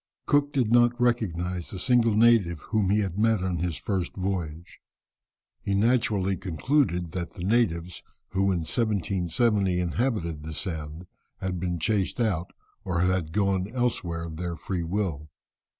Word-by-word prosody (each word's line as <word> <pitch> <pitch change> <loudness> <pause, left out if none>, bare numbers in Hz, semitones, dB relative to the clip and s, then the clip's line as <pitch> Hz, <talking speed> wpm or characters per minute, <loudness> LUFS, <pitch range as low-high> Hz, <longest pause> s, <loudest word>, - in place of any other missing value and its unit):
Cook 145 0 +2
did 130 -6 +1
not 120 +1 +4
recognize 90 -8 0
a 95 - -6
single 115 +1 +3
native 110 -7 +4
whom 105 -4 0
he 105 +2 +3
had 95 -1 -3
met 110 -3 +3
on 90 -2 -1
his 85 -1 -2
first 95 -4 -2
voyage. 90 -4 -4 0.8
He 100 - -1
naturally 105 -3 +2
concluded 90 - 0
that 90 0 -4
the 90 - -7
natives 90 -5 +1 0.3
who 95 0 +1
in 90 -3 0
1770 100 -1 +1
inhabited 90 - -1
the 80 0 -7
Sound 80 -2 -5 0.3
had 90 -1 -3
been 90 0 -2
chased 100 +5 0
out, 95 -7 0 0.3
or 90 -2 -1
had 90 -3 +1
gone 95 0 +1
elsewhere 90 -9 -1
of 80 -2 -7
their 85 0 -3
free 90 +3 -3
will. 85 -4 -2
95 Hz, 150 wpm, -27 LUFS, 85-110 Hz, 0.8 s, not